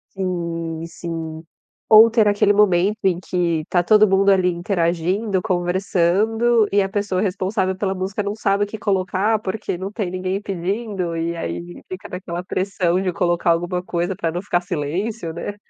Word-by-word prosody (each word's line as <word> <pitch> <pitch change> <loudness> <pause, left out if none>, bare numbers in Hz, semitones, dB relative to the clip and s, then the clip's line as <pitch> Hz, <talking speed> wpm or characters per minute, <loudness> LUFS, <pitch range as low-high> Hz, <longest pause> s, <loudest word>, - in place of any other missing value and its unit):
Sim, 170 -3 -3
sim. 165 -2 -6 0.4
Ou 220 +1 +8
ter 225 -2 +3
aquele 205 0 +3
momento 200 0 +3
em 180 -2 +2
que 170 -4 -1
tá 175 - +2
todo 215 +3 +5
mundo 195 +1 +4
ali 185 -2 +4
interagindo, 180 +3 0
conversando 195 +5 +1
e 200 - +4
a 195 - -1
pessoa 200 -2 -1
responsável 190 -1 -1
pela 195 0 -1
música 190 +2 -3
não 205 0 -2
sabe 200 -1 +1
o - - -7
que 205 - -7
colocar, 195 +1 0
porque 205 -2 -4
não 190 +2 -5
tem 205 -5 -3
ninguém 185 +1 -2
pedindo, 190 -1 -3
e 170 +1 -2
aí 85 - -6
fica 185 0 -7
naquela 180 -1 -5
pressão 185 -1 0
de 185 -2 -1
colocar 175 -2 +1
alguma 175 +2 -1
coisa 175 +1 -2
pra 165 -3 -2
não 175 +2 -3
ficar 180 -3 0
silêncio, 175 +4 -3
né. 170 +5 -5
185 Hz, 170 wpm, -21 LUFS, 175-205 Hz, 0.4 s, Ou